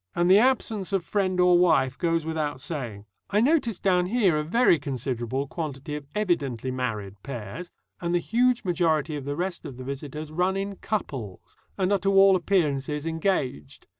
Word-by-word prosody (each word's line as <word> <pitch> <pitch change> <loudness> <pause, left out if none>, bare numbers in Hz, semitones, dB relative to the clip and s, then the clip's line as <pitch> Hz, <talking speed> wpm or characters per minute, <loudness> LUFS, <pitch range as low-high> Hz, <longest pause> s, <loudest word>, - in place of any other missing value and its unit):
And 175 +1 +3
the 195 - +8
absence 220 -5 +1
of 190 -3 0
friend 190 -3 0
or 180 -1 +5
wife 135 -7 +3
goes 165 -2 0
without 155 -4 -2
saying. 120 -9 -5 0.2
I 205 - +2
notice 245 - +2
down 180 -2 +2
here 200 -5 +2
a 150 - 0
very 175 +1 +3
considerable 130 -2 -3
quantity 150 -1 -5
of 145 -2 -7
evidently 145 - -1
married 105 -6 -4
pairs, 135 - -7 0.3
and 170 -1 -2
the - - +5
huge 240 +6 +1
majority 165 -4 +1
of 140 -2 -6
the 145 0 -3
rest 180 +2 -3
of 130 - -8
the 130 - -7
visitors 145 +3 -6
run 180 +4 0
in 195 0 -4
couples, 130 - -5 0.2
and 190 0 +1
are 200 - +3
to 195 +2 +1
all 195 0 +7
appearances 150 -5 0
engaged. 160 - -2
165 Hz, 175 wpm, -26 LUFS, 135-190 Hz, 0.3 s, the